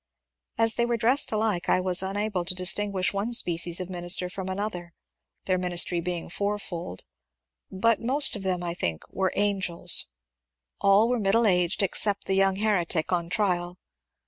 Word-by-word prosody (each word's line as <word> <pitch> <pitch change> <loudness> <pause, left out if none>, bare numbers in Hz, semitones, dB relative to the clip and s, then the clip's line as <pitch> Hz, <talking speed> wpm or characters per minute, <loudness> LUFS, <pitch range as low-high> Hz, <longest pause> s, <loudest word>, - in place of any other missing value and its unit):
As 225 0 +3
they 235 - 0
were 240 -1 0
dressed 245 +6 +4
alike 215 -5 -1
I - - +3
was 185 0 +2
unable 195 -1 -2
to 185 - -1
distinguish 190 +1 +2
one 205 +4 -2
species 175 -5 +1
of 185 - -5
minister 180 0 -1
from 190 0 -6
another, 185 -3 -5 0.3
— - - -55
their 185 -1 0
ministry 175 -1 +1
being 175 0 -4
fourfold, 195 - -5 0.4
— 65 - -62 0.2
but 220 +4 +1
most 270 +3 +3
of 205 - -6
them 185 -2 -2
I 170 -1 -3
think 85 - -3
were 190 -1 -1
*' - - -15
Angels." 190 -4 -1 0.7
All 200 +3 +4
were 245 0 0
middle 220 +3 +2
aged 180 0 +1
except 200 +1 0
the 195 - -1
young 195 0 +2
heretic 190 -6 0
on 170 -2 -1
trial. 180 -3 -1
190 Hz, 170 wpm, -26 LUFS, 175-210 Hz, 0.7 s, dressed